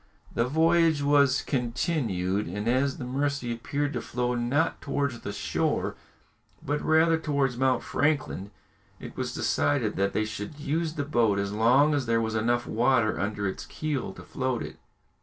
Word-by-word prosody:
The 115 - +1
voyage 160 +1 +3
was 140 -2 +4
continued, 115 - -1
and 105 +5 -4
as 130 +3 +1
the - - -6
Mercy 135 -1 -1
appeared 145 +5 -2
to - - -2
flow 125 0 -2
not 125 +7 0
towards 140 -4 -2
the 100 - -5
shore, 100 - -1 0.7
but 145 +2 -1
rather 160 +1 +3
towards 140 -5 0
Mount 130 +1 +1
Franklin, 145 -9 -1 0.5
it - - -9
was - - -3
decided 130 -7 0
that 100 +1 +1
they 110 - +1
should 110 +7 -6
use 155 +2 -1
the 145 - -2
boat 115 -8 +2
as 100 0 -2
long 125 +8 +4
as 140 -4 -1
there 115 0 +2
was 110 -1 -1
enough 120 +2 +1
water 115 -2 +2
under 100 +2 -2
its 95 - -5
keel 150 -9 -3
to - - -11
float 130 -2 -2
it. - - -9
130 Hz, 165 wpm, -27 LUFS, 110-145 Hz, 0.7 s, was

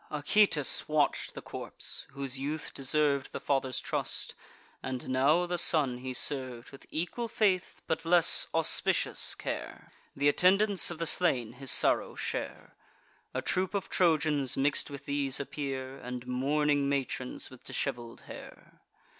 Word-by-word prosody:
Acoetes 150 0 +2
watch'd 155 -2 0
the - - -7
corpse; - - -6
whose 135 -1 -3
youth 150 +3 -4
deserv'd 140 0 +1
The - - -3
father's 135 -2 0
trust; - - -3 0.5
and 130 -1 -5
now 140 +7 +3
the 175 0 -1
son 140 -7 +2
he 130 +1 -5
serv'd 130 -2 -1
With 135 - -14
equal 180 +9 -3
faith, 195 -5 0
but 160 - -2
less 170 0 +4
auspicious - - +2
care. - - -6 0.3
Th' 140 - -4
attendants 190 +7 +4
of 170 - -5
the 165 - -2
slain 130 -10 +2
his 135 +1 -2
sorrow - - +3
share. - - -5 0.6
A - - -1
troop 185 +2 -1
of 195 - -2
Trojans 155 -6 +2
mix'd 140 +2 +1
with 140 0 -9
these 140 -1 0
appear, 135 -1 -5
And 125 0 -6
mourning 140 +3 +1
matrons 130 -3 -3
with 130 - -14
dishevel'd 120 -4 -4
hair. - - -13
140 Hz, 140 wpm, -30 LUFS, 130-160 Hz, 0.6 s, less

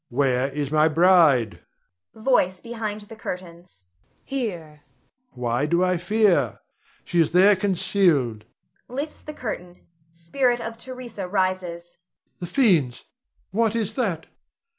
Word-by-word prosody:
Where 130 0 +1
is 140 0 -4
my 155 0 +4
bride? 160 - +4 0.6
Voice 220 -6 +1
[behind 220 -2 -5
the 210 +2 -11
curtains]. 175 - -8 0.4
Here 175 - -5 0.5
Rod. - - -24
Why 120 +3 0
do 170 +3 +2
I 180 -1 +2
fear? 180 - +2 0.4
She 175 - -1
is 165 -1 +2
there 195 +3 +6
concealed 170 - +1 0.5
[lifts 285 +5 -5
the 305 - -8
curtain; 180 -9 -7 0.3
spirit 240 +10 0
of 225 -1 -5
Theresa 245 -7 -7
rises]. 180 -3 -2 0.4
The 175 - -5
fiends! 170 - +2 0.5
what 225 +1 +1
is 220 -2 -1
that? 195 -10 -2
180 Hz, 120 wpm, -24 LUFS, 155-220 Hz, 0.6 s, there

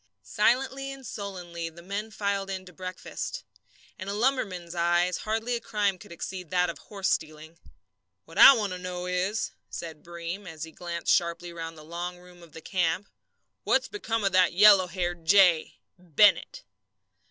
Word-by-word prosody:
Silently 265 - +1
and 270 -1 -10
sullenly 180 -6 -6
the 170 +1 -14
men 200 +4 -4
filed 200 -1 -2
in 190 -1 -5
to 180 - -14
breakfast. 185 - -6 0.6
In 185 - -6
a 200 - -3
lumberman's 205 -8 -1
eyes 175 +1 +2
hardly 225 +3 -2
a - - -2
crime 205 -3 0
could - - -14
exceed 180 0 -6
that 180 -1 +2
of - - -14
horse 195 -2 -4
stealing. 155 +1 -3 0.7
"What 165 - -7
I - - +12
want 210 -6 -1
to 180 - -6
know 180 0 -5
is," 180 +4 -1 0.2
said 160 -3 -7
Breem, 175 +3 -6
as 160 -2 -7
he 160 - -7
glanced 170 0 -1
sharply 170 0 -1
round 165 -1 -7
the 155 - -12
long 175 +2 -5
room 180 0 -17
of 170 -2 -16
the 160 - -10
camp, 180 +2 -1 0.5
"what's - - +2
become 230 - -3
of 195 - +2
that 185 -1 +4
yellow 195 0 +7
haired 175 -1 -3
jay 180 -2 +4 0.2
Bennett?" 180 +4 +3
180 Hz, 170 wpm, -27 LUFS, 170-205 Hz, 0.7 s, I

